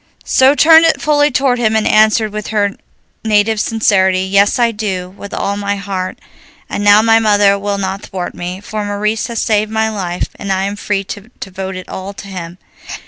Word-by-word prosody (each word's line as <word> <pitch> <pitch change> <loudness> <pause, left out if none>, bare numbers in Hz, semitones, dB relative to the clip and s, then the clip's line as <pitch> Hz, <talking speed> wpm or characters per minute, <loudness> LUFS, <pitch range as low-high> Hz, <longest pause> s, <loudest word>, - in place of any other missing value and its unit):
She 265 +2 +4
turned 320 +2 +6
it 325 - +2
fully 295 -1 +2
toward 260 -2 +1
him 220 -2 +1
and 220 - +1
answered, 215 0 +3
with 215 0 -5
her 205 -2 0 0.5
native 215 0 +2
sincerity, 190 -5 +2
"Yes, 200 +2 +2
I 235 -1 +2
do, 190 -4 -4
with 200 +1 -11
all 200 - -2
my 200 0 -2
heart, 195 -2 -5 0.5
and 205 - -4
now 205 +1 +6
my 225 0 +4
mother 205 -2 +3
will 200 0 -2
not 195 0 -3
thwart 180 -2 -5
me, 180 +2 -6
for 210 0 -5
Maurice 210 +2 -2
has 235 -2 -4
saved 215 -1 +1
my 220 0 0
life, 180 -4 -3
and 200 - -5
I 190 0 0
am 200 +1 -3
free 205 -1 -2
to 205 +3 -9
devote 190 0 -6
it 185 - -8
all 190 +1 -7
to 200 - -10
him." 180 -2 -8
205 Hz, 195 wpm, -15 LUFS, 195-220 Hz, 0.5 s, turned